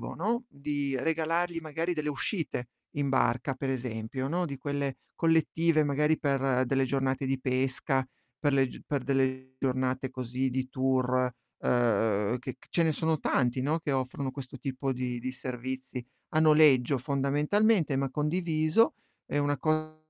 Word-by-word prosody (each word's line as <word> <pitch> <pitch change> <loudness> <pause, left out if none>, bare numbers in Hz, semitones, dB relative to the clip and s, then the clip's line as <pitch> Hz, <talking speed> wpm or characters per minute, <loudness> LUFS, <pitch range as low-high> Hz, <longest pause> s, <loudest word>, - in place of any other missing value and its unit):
no, 230 +7 0
di 140 -1 -2
regalargli, 165 +3 0
magari, 165 +3 -2
delle 150 -2 -2
uscite 145 - -3 0.3
in 145 -1 +1
barca, 130 0 +1
per 135 +1 -3
esempio, 125 0 -3
no, 175 +4 0
di 140 -3 -5
quelle 140 -1 -2 0.2
collettive, 165 -1 +3
magari 150 +2 +2
per 135 -2 +1
delle 135 +1 +2
giornate 135 +1 0
di 135 0 0
pesca, 130 +1 0 0.3
per 145 0 +1
le 135 -1 +3
g - - -11
per 140 -3 -1
delle 130 -1 0
giornate 130 0 0
così 130 +1 -2
di 130 0 -2
tour, 130 -1 +1 0.3
uhm, 110 -2 +2
che 130 +1 -6
c - - -21
ce 170 - +2
ne 160 - +3
sono 160 +1 0
tanti, 125 0 +1
no, 155 +5 +1
che 150 -3 -2
offrono 130 +1 -2
questo 135 -1 -8
tipo 135 0 -3
di 125 -1 -2
di 130 - -3
servizi 130 0 -5 0.3
a 155 - +3
noleggio 150 -4 +6
fondamentalmente, 145 - +2
ma 135 0 0
condiviso. 155 - +2 0.3
È 145 - -2
una 145 -1 +1
co 155 0 0
135 Hz, 155 wpm, -29 LUFS, 130-155 Hz, 0.3 s, noleggio